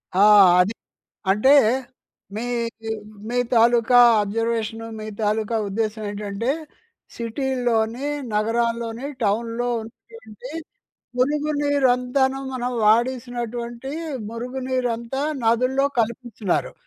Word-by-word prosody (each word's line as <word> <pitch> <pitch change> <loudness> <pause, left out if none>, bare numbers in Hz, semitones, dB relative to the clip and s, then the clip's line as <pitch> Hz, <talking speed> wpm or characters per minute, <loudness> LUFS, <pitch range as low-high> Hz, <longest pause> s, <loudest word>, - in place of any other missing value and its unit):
ఆ! - - +2 0.4
అది. 195 +5 +3 0.6
అంటే 210 +7 +3 0.9
మీ 220 - -3 0.4
మీ 225 - -6 0.4
మీ 245 - -1 0.2
తాలూకా 235 +1 +5 0.2
అబ్జర్వేషను 225 +1 -2
మీ 215 - -6
తాలూకా 215 +2 0
ఉద్దేశ్యం 215 +1 -2
ఏంటంటే, 205 +3 -4 0.7
సిటీల్లోని, 240 0 -1 0.3
నగరాల్లోని 230 +3 -1 0.2
టౌన్‍లో 230 +4 0
ఉంటున్నటువంటి 225 +1 -12 0.7
మురుగు 295 +4 +1
నీరంతాను 265 -1 +2
మనం 250 0 -2
వాడేసినటువంటి, 240 +1 0 0.4
మురుగు 250 +3 -5
నీరంతా 250 0 -2 0.2
నదుల్లో 255 +4 +2
కలిపేస్తున్నారు. 225 -4 -1
235 Hz, 85 wpm, -22 LUFS, 225-250 Hz, 0.9 s, తాలూకా